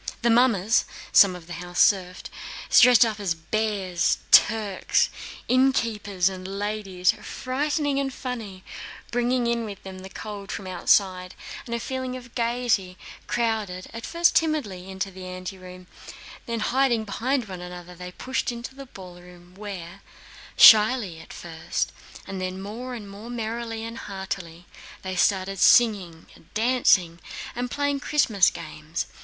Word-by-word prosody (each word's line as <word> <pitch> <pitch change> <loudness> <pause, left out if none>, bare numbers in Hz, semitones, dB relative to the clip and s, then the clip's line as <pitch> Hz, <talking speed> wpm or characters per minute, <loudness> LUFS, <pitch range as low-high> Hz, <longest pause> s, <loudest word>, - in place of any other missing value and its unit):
The 235 - +4
mummers 225 -3 +3 0.3
(some 195 -3 +6
of 175 -2 -11
the 175 - -8
house 175 +1 -6
serfs) 185 -2 +3 0.6
dressed 245 -1 +8
up 220 -2 -3
as 190 -5 -1
bears, 190 0 0
Turks, 210 -4 +4 0.4
innkeepers, 225 -7 +2
and 185 -1 -4
ladies—frightening 255 - -1
and 275 -1 -1
funny—bringing 240 +2 -4
in 235 0 0
with 205 -3 -8
them 190 -1 -9
the 190 +1 -10
cold 205 -1 -7
from 195 - -5
outside 185 0 +1 0.3
and 235 - -2
a - - -2
feeling 260 0 -4
of 245 -1 -13
gaiety, 230 -6 0 0.3
crowded, 215 -6 -2
at 230 0 -6
first 340 +1 +2
timidly, 220 - 0
into 190 +1 -4
the 185 0 -9
anteroom, 185 0 -8 0.6
then 230 -1 -2
hiding 240 0 +2
behind 235 +4 -1
one 185 -2 -7
another 180 0 -9
they 180 +1 -9
pushed 260 +6 -2
into 240 +2 -7
the 275 0 -10
ballroom 180 -3 -13
where, 195 -2 -8 0.6
shyly 215 -5 +7
at 160 - -13
first 160 -1 -4 0.3
and 190 -1 -6
then 185 0 -4
more 235 +6 -6
and 215 -4 -8
more 205 +4 -10
merrily 230 -1 -4
and 230 0 -6
heartily, 190 -4 -6 0.4
they 190 0 -4
started 190 +1 +1
singing, 190 -10 +4 0.3
dancing, 215 -7 +3 0.4
and 245 +1 -3
playing 285 +1 -1
Christmas 235 - +3
games. 155 +2 -6
205 Hz, 135 wpm, -25 LUFS, 185-240 Hz, 0.6 s, dressed